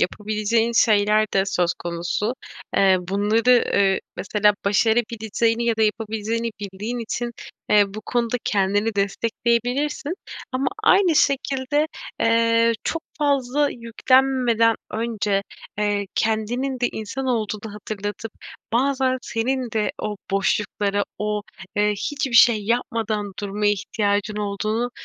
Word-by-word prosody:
yapabileceğin 215 Hz, +4 st, 0 dB
şeyler 215 Hz, -1 st, +4 dB
de 195 Hz, -, +4 dB
söz 180 Hz, -3 st, +1 dB
konusu. 175 Hz, +7 st, -3 dB, 0.4 s
Eee, 190 Hz, -1 st, +5 dB
bunları, 210 Hz, +6 st, +3 dB
ııı, 195 Hz, -1 st, +3 dB, 0.2 s
mesela 210 Hz, +3 st, +2 dB
başarabileceğini 225 Hz, +2 st, +1 dB
ya 230 Hz, -1 st, +1 dB
da 220 Hz, -, +1 dB
yapabileceğini 220 Hz, +1 st, -1 dB
bildiğin 205 Hz, +5 st, -5 dB
için, 235 Hz, +1 st, -3 dB, 0.4 s
eee, 210 Hz, -1 st, +6 dB
bu 215 Hz, -, -5 dB
konuda 240 Hz, 0 st, 0 dB
kendini 205 Hz, +2 st, +1 dB
destekleyebilirsin. 235 Hz, -, -1 dB, 0.4 s
Ama 260 Hz, +1 st, -1 dB, 0.2 s
aynı 370 Hz, -5 st, +5 dB
şekilde, 275 Hz, +1 st, +1 dB, 0.3 s
eee, 230 Hz, 0 st, +3 dB
çok 330 Hz, -, -2 dB, 0.2 s
fazla 285 Hz, -1 st, +1 dB
yüklenmeden 235 Hz, -1 st, +2 dB, 0.2 s
önce, 215 Hz, -3 st, -1 dB, 0.4 s
eee, 205 Hz, -1 st, 0 dB
kendinin 240 Hz, +4 st, -1 dB
de 245 Hz, -, +2 dB
insan 220 Hz, +5 st, -5 dB
olduğunu 215 Hz, -3 st, -2 dB
hatırlatıp 210 Hz, +1 st, -6 dB, 0.4 s
bazen 260 Hz, +1 st, +1 dB
senin 250 Hz, +2 st, -2 dB
de 215 Hz, -1 st, -1 dB
o 210 Hz, -1 st, -3 dB
boşlukları, 200 Hz, +1 st, 0 dB
o, 210 Hz, 0 st, -1 dB, 0.4 s
ııı, 210 Hz, 0 st, +3 dB
hiçbir 270 Hz, +6 st, -3 dB
şey 230 Hz, -2 st, +6 dB
yapmadan 225 Hz, -3 st, -1 dB
durmaya 205 Hz, +1 st, 0 dB
ihtiyacın 205 Hz, +1 st, -1 dB
olduğunu, 215 Hz, +3 st, -2 dB
220 Hz, 115 wpm, -22 LUFS, 205-245 Hz, 0.4 s, eee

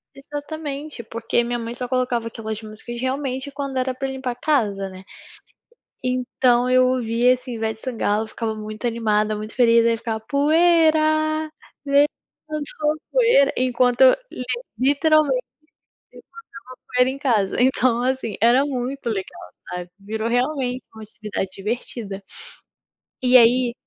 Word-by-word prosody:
Exatamente. 290 Hz, -1 st, -6 dB
Porque 230 Hz, +1 st, -1 dB
minha 240 Hz, 0 st, -2 dB
mãe 230 Hz, +1 st, -5 dB
só 250 Hz, 0 st, -4 dB
colocava 250 Hz, -2 st, 0 dB
aquelas 220 Hz, -1 st, -6 dB
músicas 220 Hz, +2 st, -8 dB
realmente 265 Hz, +1 st, -2 dB
quando 275 Hz, -1 st, -4 dB
era 255 Hz, 0 st, 0 dB
pra 270 Hz, +1 st, -4 dB
limpar 265 Hz, -1 st, -3 dB
a -, -, -7 dB
casa, 210 Hz, -9 st, 0 dB
né, 185 Hz, 0 st, -11 dB, 1.0 s
então 250 Hz, -1 st, +1 dB
eu 255 Hz, 0 st, +5 dB
ouvia 245 Hz, 0 st, +2 dB
assim, 250 Hz, -1 st, -7 dB
Ivete 220 Hz, 0 st, -3 dB
Sangalo, 220 Hz, -4 st, -1 dB
eu -, -, -11 dB
ficava 220 Hz, 0 st, -3 dB
muito 215 Hz, +2 st, -6 dB
animada, 215 Hz, -2 st, +1 dB
muito 215 Hz, +1 st, -7 dB
feliz, 235 Hz, -2 st, +5 dB
aí 230 Hz, -, +4 dB
eu -, -, -5 dB
ficava: 220 Hz, -1 st, -3 dB
"Poeira, 310 Hz, +2 st, +3 dB, 0.3 s
levantou 300 Hz, +1 st, -1 dB
poeira" 465 Hz, -, +4 dB
enquanto 250 Hz, 0 st, +3 dB, 0.7 s
literalmente 285 Hz, -1 st, +3 dB, 0.7 s
levantava -, -, -18 dB, 0.6 s
a -, -, -20 dB
poeira 250 Hz, +1 st, +4 dB
em 270 Hz, -, -4 dB
casa, 230 Hz, -9 st, +1 dB
então 250 Hz, -1 st, +3 dB
assim 255 Hz, -5 st, -1 dB
era 245 Hz, +4 st, +5 dB
muito 260 Hz, -1 st, -4 dB
legal, 195 Hz, -3 st, -5 dB, 0.2 s
sabe. 180 Hz, 0 st, -6 dB
Virou 220 Hz, +3 st, -4 dB
realmente 255 Hz, 0 st, 0 dB
uma 220 Hz, -, -9 dB
atividade 210 Hz, -3 st, -5 dB
divertida. 205 Hz, -1 st, -5 dB, 1.0 s
E 250 Hz, 0 st, +4 dB
aí 240 Hz, +1 st, +4 dB
250 Hz, 135 wpm, -22 LUFS, 225-275 Hz, 1.0 s, eu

